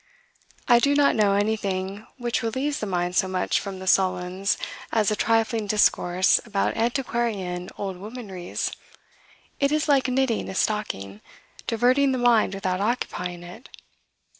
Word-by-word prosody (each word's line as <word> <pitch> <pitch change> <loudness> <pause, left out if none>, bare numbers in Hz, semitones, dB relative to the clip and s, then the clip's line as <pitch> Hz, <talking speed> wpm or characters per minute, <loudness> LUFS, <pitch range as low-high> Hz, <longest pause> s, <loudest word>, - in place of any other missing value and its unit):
"I 240 - +6
do 285 +3 +2
not 285 -1 +4
know 205 -2 +3
anything 200 -1 -2
which 240 -2 -1
relieves 260 +6 -2
the 215 - -3
mind 180 -1 -1
so 190 - +3
much 185 -1 0
from 195 -2 -6
the 190 - -8
sullens 185 +1 +1 0.3
as 215 -2 +2
a - - +1
trifling 225 -1 +1
discourse 185 -3 +3
about 210 -4 -1
antiquarian 225 -7 -2
oldwomanries. 195 -1 -5 0.9
It 280 0 +2
is 305 +1 +1
like 275 -3 +3
knitting 255 -3 0
a 190 - -6
stocking, 105 - -2 0.5
diverting 255 +4 +3
the - - 0
mind 235 -5 +3
without 190 -1 -2
occupying 180 -6 -2
it." 185 +9 -12
210 Hz, 140 wpm, -24 LUFS, 185-240 Hz, 0.9 s, I